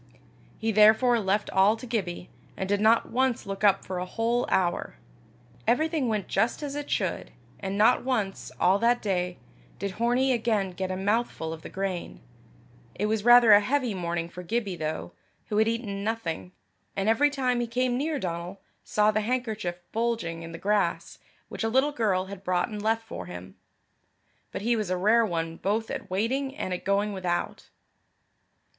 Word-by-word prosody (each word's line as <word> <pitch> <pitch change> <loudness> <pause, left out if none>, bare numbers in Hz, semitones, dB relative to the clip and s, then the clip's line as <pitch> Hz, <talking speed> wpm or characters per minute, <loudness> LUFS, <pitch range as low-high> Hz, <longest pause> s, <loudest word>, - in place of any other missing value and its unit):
He 225 0 -1
therefore 220 +3 +5
left 205 0 0
all 195 +3 +4
to 225 - -9
Gibbie, 185 -7 -3 0.3
and 190 - -2
did 205 +1 +1
not 225 +2 +3
once 255 0 +1
look 195 0 -5
up 200 -2 +4
for 185 -1 -4
a 180 - -3
whole 230 +5 0
hour. 175 -2 0 0.7
Everything 310 +1 +2
went 210 -4 -1
just 225 +8 0
as 285 -1 -4
it 290 0 -5
should; - - -1 0.3
and 195 0 -3
not 225 +4 +4
once, 220 -7 -2
all 190 +3 +4
that 240 +2 +3
day, 180 -3 -1 0.4
did 200 -1 -5
Hornie 250 +3 +2
again 220 -5 0
get 185 +1 -4
a 185 - -2
mouthful 195 -5 -1
of 160 - -9
the - - -9
grain. 190 -2 -4 0.8
It 210 - -1
was 215 -1 0
rather 240 -1 +8
a 205 - +9
heavy 250 +1 0
morning 170 -2 -2
for 180 +1 -9
Gibbie, 200 +1 -2
though, 155 - -4 0.4
who 210 - -1
had 220 +1 +4
eaten 220 -4 -2
nothing, 200 -6 -3 0.4
and 195 +1 -1
every 270 +7 +4
time 255 -4 0
he 240 - -1
came 250 +1 0
near 295 +4 -1
Donal, 175 -2 -4 0.2
saw 210 0 +2
the 215 0 0
handkerchief 220 -6 -2 0.2
bulging 225 -8 -1
in 165 0 -8
the 165 - -7
grass, 205 +3 0 0.3
which - - -5
a 225 - +1
little 265 +5 +3
girl 205 -9 0
had 195 0 -9
brought 180 +3 0
and 210 -1 -5
left 225 +1 +1
for 90 - -7
him. 90 +1 -9 1.0
But - - -5
he 235 +2 +2
was 215 -4 -2
a 185 - 0
rare 220 +5 +4
one 165 -2 -3
both 220 +3 -1
at - - -5
waiting 260 +8 -1
and 185 -10 -3
at 180 - -5
going 200 +1 +1
without. 180 -2 -3
210 Hz, 180 wpm, -27 LUFS, 185-235 Hz, 1.0 s, a